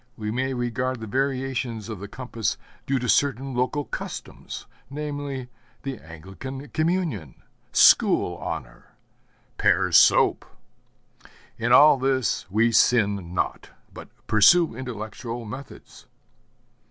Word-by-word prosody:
We 105 -1 -4
may 130 +3 -1
regard 125 +1 -2
the 110 - -6
variations 130 -2 -2
of 110 -4 -6
the 100 - -7
compass 115 -1 -3 0.3
due 135 - +1
to 125 -1 -3
certain 135 0 +1
local 130 +4 -1
customs, - - -7 0.2
namely, 145 -2 -5 0.4
the 135 -1 -5
Anglican 95 - -9
communion, 155 - -2 0.3
school - - +5
honor, - - -7 0.6
Pears' - - +4
soap. - - +5 1.2
In 120 +1 0
all 145 +3 +8
this 130 -6 0
we 110 +4 +2
sin 100 -6 +2
not, - - -2 0.2
but - - -11 0.2
pursue 110 +8 +5
intellectual 115 -1 -6
methods. 130 +6 -11
125 Hz, 110 wpm, -24 LUFS, 110-135 Hz, 1.2 s, all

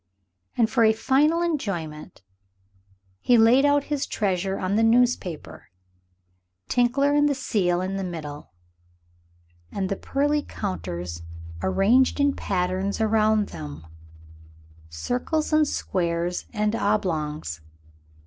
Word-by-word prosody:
And 230 - +4
for 235 0 +2
a 220 0 +5
final 295 +9 +2
enjoyment 175 - -4 1.0
he 245 - +4
laid 235 +5 +5
out 285 0 +3
his 290 -1 -2
treasures 195 -1 -1
on 185 +2 -1
the 220 - +3
newspaper 225 - +1 1.0
Tinkler 265 +4 +2
and 290 0 +3
the 285 - 0
seal 185 -9 0
in 190 +1 -3
the 195 - -3
middle 155 -5 -7 1.2
and 190 -2 -2
the 195 - -1
pearly 290 +7 0
counters 85 - -5 0.4
arranged 215 - +3
in 285 -1 +2
patterns 185 +2 -2
round 215 -1 +2
them, 75 -1 -8 1.0
circles 250 - -2
and 310 -1 +4
squares 175 -5 -2
and 210 -1 0
oblongs. 155 - -1
210 Hz, 110 wpm, -24 LUFS, 170-260 Hz, 1.2 s, a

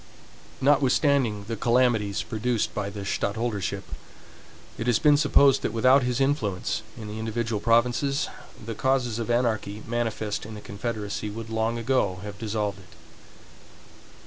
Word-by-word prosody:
Notwithstanding 135 -5 +3
the 115 - -2
calamities 115 -3 +2
produced 115 0 -1
by 100 -1 -2
the 100 0 -7
stadtholdership, 100 -2 -2 1.0
it 115 - -3
has 120 -3 +4
been 150 -1 +5
supposed 140 -2 +4
that - - -2
without 130 +4 +5
his 125 0 -1
influence 135 -9 0 0.2
in 110 - -7
the 105 +1 -6
individual 110 0 -2
provinces, 120 +5 +2 0.4
the 115 - -4
causes 125 0 0
of 115 - -3
anarchy 110 -3 0
manifest 115 -3 -2
in 110 0 -8
the - - -7
confederacy 105 0 -4
would 110 +2 -7
long 110 +1 0
ago 115 -6 0
have 105 0 -8
dissolved 105 -2 -2
it. 85 -4 -17
115 Hz, 140 wpm, -26 LUFS, 105-125 Hz, 1.0 s, been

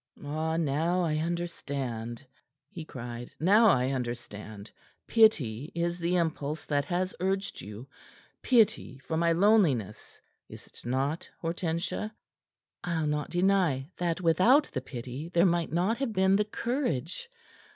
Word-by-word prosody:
"Ah, 160 +2 -1
now 165 +4 +1
I 155 -2 0
understand!" 140 -8 -4 0.5
he 165 - -7
cried. 120 -4 -7
"Now 210 +7 +5
I 130 -8 +3
understand. 115 -5 -6 0.3
Pity 150 - +3
is 170 +1 -1
the 175 +1 0
impulse 155 -3 -1
that 145 -1 0
has 185 +1 -1
urged 195 +2 -2
you 105 +5 -9 0.5
pity 220 - +2
for 140 +4 -5
my 170 +1 +2
loneliness, 165 - +2 0.3
is't - - -13
not, 135 +6 -1
Hortensia?" 170 +5 -2 0.7
"I'll 165 -3 -1
not 150 0 -1
deny 175 -6 +1
that 175 0 -1
without 185 - +5
the 130 - -2
pity 130 +4 -7
there 175 +1 +3
might 170 -2 +1
not 185 - +1
have 270 -5 -1
been 190 0 +3
the 210 +1 +2
courage. 230 - -2
165 Hz, 130 wpm, -29 LUFS, 135-185 Hz, 0.7 s, Now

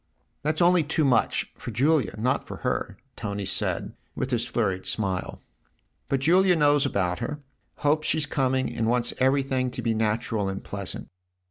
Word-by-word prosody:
"That's 155 +3 +1
only 175 0 +5
too 155 +1 0
much 125 -4 +2
for - - -6
Julia 130 -2 +2
not 125 +4 0
for - - -8
her" - - -1 0.2
Tony 100 -1 -4
said 95 - -1 0.2
with 130 - -3
his 120 -1 0
flurried 95 -6 -1
smile. 95 -4 -2 0.3
" - - -45
But 135 -1 +1
Julia 180 +5 +5
knows 145 -2 +4
about 90 -7 -1
her, 150 0 -4 0.4
hopes 155 +1 +1
she's 155 -1 +3
coming 130 -2 0
and 115 -1 0
wants 120 0 +2
everything 130 -1 +2
to - - -5
be 115 - +1
natural 110 -1 0
and 95 0 -5
pleasant." 100 -2 -5
130 Hz, 165 wpm, -26 LUFS, 110-145 Hz, 0.4 s, only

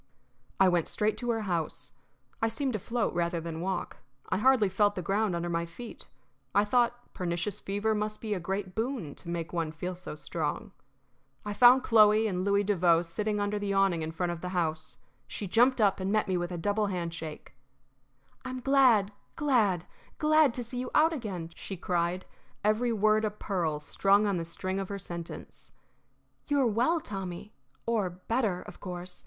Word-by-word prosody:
I 190 - +6
went 175 -3 +2
straight 215 0 0
to 240 - -3
her 225 -1 +1
house. 170 -6 -3 0.5
I 225 - +3
seemed 255 +4 -2
to 215 - -1
float 230 +3 -1
rather 170 0 0
than 165 0 -5
walk; 185 0 -3 0.3
I - - +1
hardly 255 -3 +5
felt 205 +2 +2
the 180 - -4
ground 200 +1 +1
under 170 0 -2
my 170 0 -1
feet; 225 +8 -10 0.5
I 205 +1 +5
thought 240 +2 0
pernicious 175 +3 -2
fever 205 +3 -1
must 215 0 -2
be 215 -2 -2
a 195 - -2
great 190 +1 -3
boon 225 - -3
to 170 - -10
make 170 0 -4
one 165 -2 -1
feel 180 +3 -4
so 180 -3 -7
strong. 160 +7 -3 0.7
I 210 - -3
found 250 +4 +7
Chloe 215 -1 +5
and 185 -4 -1
Louis 200 +1 +2
Devoe 175 -4 +3
sitting 210 +5 -2
under 205 0 -1
the 200 -1 -1
awning 195 -4 +2
in 155 - -3
front 175 +2 -1
of 170 -1 -6
the 180 - -4
house. 160 -5 -2 0.3
She 205 - -5
jumped 245 +6 +4
up 200 -3 +3
and 190 +1 -1
met 215 0 +2
me 190 - 0
with 175 0 -2
a 175 - -3
double 205 +4 0
handshake. 170 -4 -5 0.9
"I'm 255 0 -5
glad, 250 -6 +4 0.2
glad, 220 - +2 0.3
glad 310 -2 +4
to 245 - -3
see 245 +2 -6
you 250 0 -3
out 320 +2 +5
again!" 190 - -5
she 190 +3 -7
cried, 175 +1 -1 0.4
every 215 +3 +2
word 215 0 +3
a 215 - +2
pearl 180 -7 -2
strung 195 +7 +3
on 200 -3 +1
the 165 - -3
string 185 +3 -3
of 195 - -4
her 200 - -3
sentence. 170 -3 -8 0.8
"You 290 -1 +2
are 265 - +4
well, 245 +9 +2
Tommy 195 - -6 0.3
or 220 -5 +1
better, 185 +2 -1
of - - -12
course. 180 -1 -6
200 Hz, 185 wpm, -29 LUFS, 175-220 Hz, 0.9 s, found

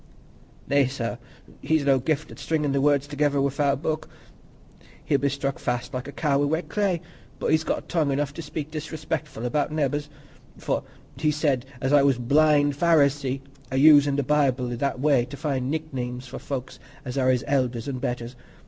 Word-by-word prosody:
"Nay, 140 -1 +3
sir, 125 -2 -4 0.4
he's 155 0 +1
no 135 -1 +4
gift 140 +3 -1
at - - -11
stringin' 150 -3 0
the 135 0 +1
words 145 -1 +3
together 145 0 0
wi'out 140 +1 +1
book; 155 -1 -2 1.0
he'd 140 -3 +2
be 140 - +2
stuck 140 0 -3
fast 125 +1 -2
like 130 +1 -4
a - - -6
cow 140 -1 +1
i' - - +3
wet 160 +2 -1
clay. 190 -3 0 0.4
But - - -1
he's 155 0 +3
got - - -2
tongue 155 -5 +1
enough 140 +1 -1
to 165 - -6
speak 155 -1 -6
disrespectful 155 -4 -4
about's 145 +5 0
neebors, 145 -1 -1 0.5
for - - -1 0.4
he 150 +2 +1
said 145 -4 0
as 130 +2 0
I 145 - +7
was 135 -2 +3
a - - -6
blind 145 +2 +4
Pharisee—a 140 -4 +1
usin' 145 -1 +7
the 140 - +1
Bible 130 -3 +1
i' - - -2
that 135 +1 -2
way 140 -3 +3
to 140 - -9
find 135 -3 -2
nick 155 0 -3
names 125 0 -4
for 130 - -8
folks 130 -2 -5 0.3
as 125 0 -5
are 130 -2 +2
his 125 -1 +2
elders 125 -4 0
an' 135 -2 -3
betters! 125 -1 -4
140 Hz, 190 wpm, -25 LUFS, 130-150 Hz, 1.0 s, I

